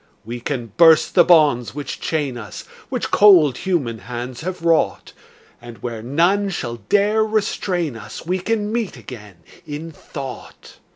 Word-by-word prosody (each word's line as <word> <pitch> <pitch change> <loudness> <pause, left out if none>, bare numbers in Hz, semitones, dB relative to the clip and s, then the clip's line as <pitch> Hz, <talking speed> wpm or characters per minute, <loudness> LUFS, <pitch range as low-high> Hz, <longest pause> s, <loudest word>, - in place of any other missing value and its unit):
We 120 +2 -6
can 120 -3 -4
burst 165 -2 +6
the 175 - +6
bonds 150 -9 +3
which 145 -3 -5
chain 145 -5 -2
us, 115 -3 -8 0.3
Which - - -3
cold 170 -11 +6
human 140 - -1
hands 120 +3 -7
have 180 0 -5
wrought, 165 -1 +1 0.5
And 120 -1 -11
where 115 -3 -4
none 175 - +1
shall 120 -10 -4
dare 205 - +2
restrain 190 - -1
us 110 +4 -9
We 185 +2 -1
can 210 +2 -1
meet 230 -3 -2
again, 105 -8 -12 0.2
in 150 +3 -7
thought. 135 -4 -10
150 Hz, 150 wpm, -20 LUFS, 120-185 Hz, 0.5 s, burst